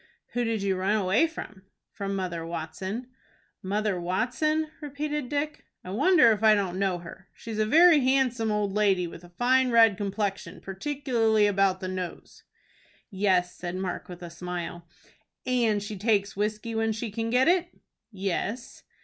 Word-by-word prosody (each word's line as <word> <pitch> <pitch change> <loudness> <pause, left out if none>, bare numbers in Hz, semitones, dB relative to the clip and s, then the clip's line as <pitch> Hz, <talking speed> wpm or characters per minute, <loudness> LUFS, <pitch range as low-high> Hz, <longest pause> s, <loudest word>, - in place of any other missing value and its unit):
"Who 245 - 0
did 225 -3 -1
you 195 -2 0
run 195 +3 +1
away 210 - +3
from?" 215 -11 -9 0.3
"From 200 0 -4
Mother 180 -3 -3
Watson." 170 +8 -5 0.5
"Mother 205 0 -1
Watson?" 250 - 0
repeated 295 -1 -4
Dick. 295 +1 -2 0.2
"I 180 - -7
wonder 290 - +5
if 215 - 0
I 215 -1 +6
don't 190 -3 -2
know 190 -2 +1
her. 175 +2 -12
She 230 - -9
is 215 - -4
a 215 - +2
very 325 +5 +7
handsome 255 -4 +1
old 210 -2 0
lady, 195 -4 +2
with 170 0 -9
a 175 - -13
fine 255 +8 +2
red 225 -4 +5
complexion, 200 0 -3
particularly 225 -1 0
about 195 -2 +2
the 185 - -3
nose." 185 -2 -6 0.7
"Yes," 190 -2 +1
said 175 0 -5
Mark, 185 -1 -4
with 180 0 -9
a 170 - -8
smile. 175 0 -6 0.6
"And 230 -5 +1
she 210 +1 -6
takes 200 -1 +1
whiskey 215 +3 -2
when 225 0 0
she 220 0 -5
can 225 +2 -3
get 250 +4 +3
it?" 355 0 +3 0.4
"Yes." 200 +4 -4
210 Hz, 165 wpm, -27 LUFS, 185-245 Hz, 0.7 s, very